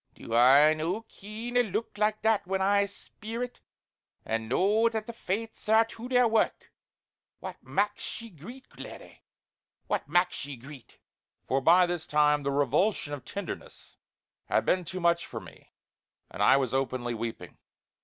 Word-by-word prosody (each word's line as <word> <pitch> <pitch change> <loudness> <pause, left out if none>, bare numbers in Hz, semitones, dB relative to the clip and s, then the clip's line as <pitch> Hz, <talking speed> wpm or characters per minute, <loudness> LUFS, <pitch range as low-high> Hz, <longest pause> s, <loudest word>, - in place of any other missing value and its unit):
Do 115 - -8
I 135 +6 +7
no 170 +8 -2
ken 220 +3 -8
a 245 - +6
look 225 0 -3
like 215 +1 0
that 220 -3 +2
when 190 +1 0
I 200 +1 +3
speer 225 +4 -6
it, 245 - -7 0.7
and 110 0 -2
know 210 - +3
that 220 -2 -3
the 235 - -7
Fates 220 +1 -4
are 220 +1 +6
to 230 +2 -9
their 250 -1 +4
wark. 225 -1 0 0.7
What - - -8
maks 205 +1 -2
ye 230 -1 -10
greet 220 - -11
laddie; - - -10 0.6
what - - -2
maks 175 +3 +2
ye 140 0 -6
greet?" 130 +1 -13 0.5
for 135 +1 +1
by 175 +5 +6
this 175 -2 -3
time 150 0 +3
the 140 - -1
revulsion 145 - +1
of 145 - -6
tenderness 200 - -8 0.5
had - - +1
been 180 -1 +1
too 185 +3 -5
much 170 -1 +2
for - - -6
me - - -15 0.6
and - - -6
I - - +6
was 130 -3 -1
openly 130 -2 -1
weeping. 115 -6 -6
185 Hz, 165 wpm, -28 LUFS, 140-220 Hz, 0.7 s, I